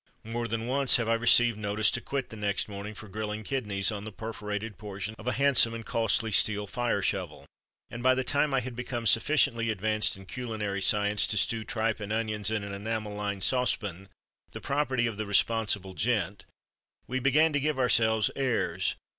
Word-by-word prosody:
More 115 +1 -3
than 115 +1 -3
once 135 +2 +3
have 115 -2 -2
I 115 - +3
received 120 -1 +4
notice 105 0 +1
to 120 - -1
quit 135 -2 -3
the - - -7
next 105 -1 -1
morning 105 +1 -7
for 110 - -10
grilling 105 +2 -4
kidneys 105 -5 -1
on 105 -1 -5
the 110 - -7
perforated 105 -1 -5
portion 100 0 -6
of 115 - -10
a 125 - +1
handsome 125 -2 +4
and 115 -1 -7
costly 115 -1 +1
steel 105 0 +3
fire 120 -2 -1
shovel. 90 -7 -2 0.5
And 120 - -6
by 130 +1 +4
the 130 - 0
time 145 +3 +1
I 135 -1 +2
had 125 0 -7
become 120 -1 -4
sufficiently 115 -1 +2
advanced 110 0 +1
in 95 - -12
culinary 110 -4 -4
science 105 +2 +2
to 105 - -1
stew 110 +3 0
tripe 110 0 -1
and 105 -1 -6
onions, 110 -2 -1
in 110 -2 -1
an 100 0 -6
enamel 105 +1 -3
lined 100 -2 -3
saucepan, 105 -7 0 0.4
the - - -6
property 135 -4 0
of 115 -3 -3
the 110 -1 -3
"responsible 105 -2 +1
gent," 100 -3 -1 0.6
we 130 +1 -2
began 150 +4 +3
to 145 - +2
give 150 0 -1
ourselves 110 -4 +3
airs. 130 -4 0
110 Hz, 190 wpm, -28 LUFS, 105-120 Hz, 0.6 s, received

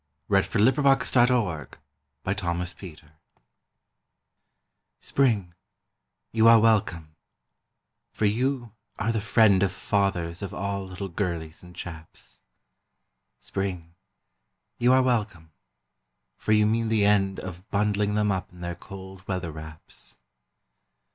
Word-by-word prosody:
WELCOME 100 +5 +3
TO 125 - +2 0.5
SPRING 90 -4 -4 1.9
Spring, 110 -10 +1 0.8
you 110 0 +4
are 115 0 +8
welcome, 90 -8 +1 0.9
for 110 - -2
you 120 +2 0 0.3
are 110 +1 0
the 110 -2 -1
friend 105 -3 +4
of 100 -2 +2
Fathers 95 -3 -1
of 100 - -5
all 100 0 -3
little 95 +1 -6
girlies 85 -3 -4
and 90 0 -14
chaps. 80 -2 -10 1.0
Spring, 90 -4 -4 0.9
you 120 +1 +4
are 130 0 +5
welcome, 105 -10 -1 0.8
for - - -3
you 105 0 +5
mean 115 +1 +1
the 110 -2 +2
end 95 -2 +2
of 95 0 -9
Bundling 105 0 +1
them 105 -1 +2
up 95 -1 -3
in 90 0 -15
their 85 0 -3
cold 95 +1 -11
weather 90 -3 -3
wraps. 80 0 -10
100 Hz, 110 wpm, -26 LUFS, 90-110 Hz, 1.9 s, are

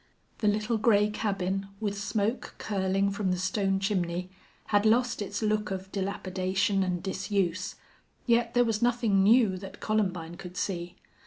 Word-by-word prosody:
The 215 - +1
little 215 +2 +1
gray 210 -1 +4
cabin, 195 -2 -1
with 205 -2 -2
smoke 210 +3 -2
curling 195 -1 0
from 200 -1 -1
the 180 - +1
stone 195 +1 0
chimney, 180 -2 -1 0.4
had 205 0 +5
lost 225 +1 +2
its 205 +2 -3
look 210 0 +1
of 190 0 -5
dilapidation 195 0 0
and 180 -2 -1
disuse, 190 -2 -1 0.5
yet 235 -1 +2
there 245 0 +5
was 225 -2 0
nothing 235 -5 +3
new 215 -1 +5
that 195 0 -9
Columbine 180 -6 -1
could 180 0 -9
see. 175 -2 -3
200 Hz, 150 wpm, -28 LUFS, 190-215 Hz, 0.5 s, had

